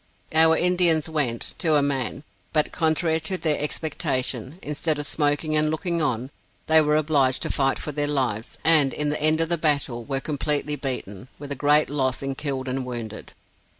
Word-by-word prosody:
Our 160 0 +5
Indians 175 -3 +3
went, 145 -8 -2
to 160 -4 +2
a 145 - +4
man; 135 0 -2 0.3
but 155 -2 +2
contrary 160 0 +1
to 175 +4 -2
their 155 -4 +1
expectation, 135 -3 -1
instead 150 +1 -1
of 145 - -3
smoking 150 +1 0
and 155 0 +2
looking 170 +2 -1
on, 130 -2 -1 0.3
they 160 0 +5
were 150 0 +2
obliged 145 -4 +2
to - - -2
fight 135 -1 +1
for 150 - -4
their 145 0 -1
lives, 125 -7 -1
and 150 -5 +4
in 150 0 -1
the 150 - -2
end 155 +1 +3
of 165 - -1
the 170 -2 0
battle 140 -6 0
were 135 +2 -3
completely 150 +1 -2
beaten, 125 -7 -5
with 145 0 -9
a - - -2
great 145 +2 +3
loss 135 -2 -1
in 135 0 -2
killed 135 -2 -4
and 130 +1 -2
wounded. 115 -4 -7
150 Hz, 185 wpm, -24 LUFS, 135-155 Hz, 0.3 s, Our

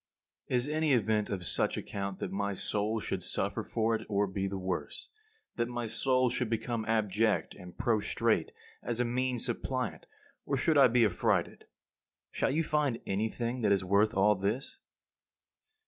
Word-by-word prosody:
Is 125 +1 0
any 155 -1 +2
event 110 -3 +2
of 95 -3 -3
such - - 0
account 100 -1 -4
that 95 - -4
my 100 0 -1
soul 105 +3 -1
should - - -3
suffer - - -2
for 115 0 0
it 110 0 -1
or 100 -1 +2
be 95 0 -2
the 95 0 -4
worse; 95 0 -4 0.5
that 120 0 +1
my 120 -1 -3
soul 130 +2 +2
should 125 -2 -1
become 115 0 -2
abject 110 0 +1
and 90 -2 -12
prostrate 110 -3 +1 0.3
as 120 -1 -3
a 125 - +2
mean 125 +1 0
suppliant, 120 -6 -2 0.4
or 140 - -1
should 140 -3 +5
be 120 -1 +5
affrighted? 100 - 0 0.7
Shall - - 0
you 155 +5 +1
find 150 -6 0
anything 115 +5 -2
that 105 - +2
is 95 -1 +2
worth 100 +3 +3
all 100 +2 +5
this? 105 +7 -2
110 Hz, 160 wpm, -31 LUFS, 100-125 Hz, 0.7 s, should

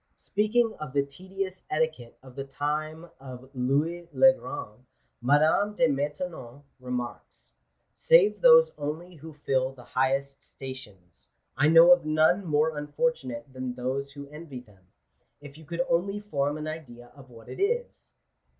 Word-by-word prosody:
Speaking 220 +2 +1
of 150 -4 -7
the 140 -1 +2
tedious 185 +5 -6
etiquette 155 -6 -2
of 130 -2 -14
the 135 - -4
time 155 +4 -4
of 130 0 -11
Louis 145 +7 -1
le 265 0 +7
Grand, 110 - -8 0.4
Madame 155 +10 +3
de 250 - +3
Maintenon 145 -2 -4 0.2
remarks, 125 -1 -7 0.2
" - - -48
Save - - +4
those - - +7
only 155 +5 -5
who 160 0 -11
fill 135 -3 -1
the 125 -2 -14
highest 135 +2 -1
stations, 105 -10 -11 0.2
I 145 - +3
know 165 +2 +8
of 175 -1 +6
none 155 +5 +3
more 155 -1 +1
un 145 0 -5
fortunate 145 - -2
than 130 -1 -5
those 130 +2 -3
who 140 0 -9
envy 150 -4 -9
them. 95 -6 -23 0.5
If 145 -1 -12
you 160 0 -14
could 170 +3 -2
only 195 +4 0
form 145 -8 -2
an 155 - -6
idea 120 -7 -9
of 135 -2 -15
what 115 -2 -15
it - - -9
is 480 +5 -2
145 Hz, 155 wpm, -27 LUFS, 130-170 Hz, 0.5 s, know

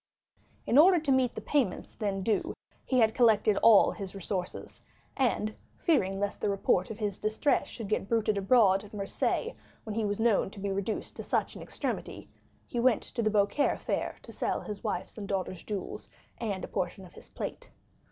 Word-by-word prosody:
In 260 - +5
order 355 +2 +7
to 300 -3 -1
meet 260 -2 +2
the - - -5
payments 255 -11 -1
then 200 -3 -2
due; 215 +1 0 0.3
he 260 - 0
had 220 -1 +4
collected 220 -4 +4
all 220 -3 +7
his 195 -2 -7
resources, 185 -1 -5 0.3
and, 230 -5 0 0.2
fearing 195 - +1
lest 205 0 -2
the - - +1
report 195 -2 +1
of 220 - -6
his 205 -3 -3
distress 215 +7 +1
should 225 -4 -7
get 200 -1 -1
bruited 220 -2 +2
abroad 195 -1 +4
at 210 0 -12
Marseilles 210 - -1 0.3
when 215 - -5
he 225 +1 -1
was 205 0 -1
known 225 -4 +3
to 200 - -12
be 200 0 -2
reduced 200 +3 -3
to - - -5
such - - -1
an - - -8
extremity, - - -5 0.3
he 240 - -4
went 240 -1 +3
to 235 - -4
the 215 - +2
Beaucaire 210 +7 +2
fair - - -2
to - - -10
sell - - -1
his 210 -2 -7
wife's 215 0 -3
and 200 - -6
daughter's 185 -3 -3
jewels 205 -3 -5 0.3
and 205 -5 -3
a - - -4
portion 190 +1 -3
of 175 - -16
his - - -14
plate. - - -6
210 Hz, 190 wpm, -29 LUFS, 195-230 Hz, 0.3 s, order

